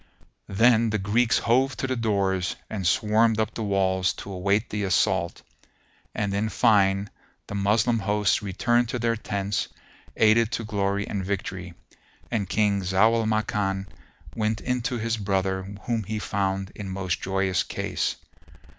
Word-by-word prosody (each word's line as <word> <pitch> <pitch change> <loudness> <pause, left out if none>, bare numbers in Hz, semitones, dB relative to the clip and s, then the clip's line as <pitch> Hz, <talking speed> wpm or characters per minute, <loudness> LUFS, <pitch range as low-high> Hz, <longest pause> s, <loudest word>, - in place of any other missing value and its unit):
Then 115 +3 +4
the 105 - 0
Greeks 110 +4 +2
hove 130 +3 +2
to - - -2
the 130 -1 -1
doors 100 -5 0 0.2
and 100 -5 -2
swarmed 110 +1 +3
up 110 - 0
the - - -5
walls 95 -3 +1
to 100 - -9
await 100 +4 0
the 105 -1 -2
assault; 95 -2 +1 0.7
and 100 -2 -1
in 105 +2 0
fine 100 -4 +3 0.3
the - - -8
Moslem 105 +4 +2
hosts 105 -2 +1
returned 120 +4 +1
to 125 - -2
their 115 -1 0
tents 100 -2 -2 0.5
aided 110 +1 +4
to 115 - -2
glory 100 -1 -1
and 100 -2 -3
victory, 95 -2 -4 0.6
and 105 -5 -1
King 105 -2 +2
Zau 95 +5 +3
al 115 -1 +1
Makan 105 -3 0 0.5
went 110 -1 0
in 125 0 -1
to 120 +1 -2
his 115 0 -1
brother 95 -1 -1
whom 115 -2 -1
he 110 +3 -3
found 95 -1 -2
in 105 -2 -7
most 95 -2 -2
joyous 95 -1 0
case. - - -2
105 Hz, 155 wpm, -25 LUFS, 95-110 Hz, 0.7 s, Then